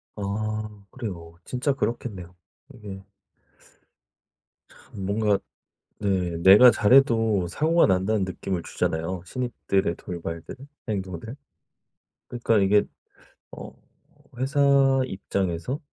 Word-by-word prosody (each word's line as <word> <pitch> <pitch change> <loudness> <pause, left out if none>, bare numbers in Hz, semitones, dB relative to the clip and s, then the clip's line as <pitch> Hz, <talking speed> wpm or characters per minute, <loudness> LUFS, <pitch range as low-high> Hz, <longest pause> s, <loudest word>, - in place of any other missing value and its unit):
아 105 +1 -4
그래요. 85 -10 -7
진짜 130 +3 -1
그렇겠네요. 105 -9 -4 0.4
이게 100 -5 -9 1.6
참 95 - -10
뭔가 105 0 +1 0.6
네 95 -4 -1
내가 105 +7 +9
잘해도 115 -5 +3
사고가 160 - +3
난다는 95 +2 +1
느낌을 95 -1 -4
주잖아요. 85 +3 -3
신입들의 100 -5 -1
돌발들, 85 +1 -7 0.3
행동들. 100 +3 -5 0.9
그러니까 120 -2 0
이게 100 +1 +4 0.7
어 - - -9 0.7
회사 135 +3 -1 0.5
입장에서 95 - -3
100 Hz, 220 characters per minute, -25 LUFS, 95-115 Hz, 1.6 s, 내가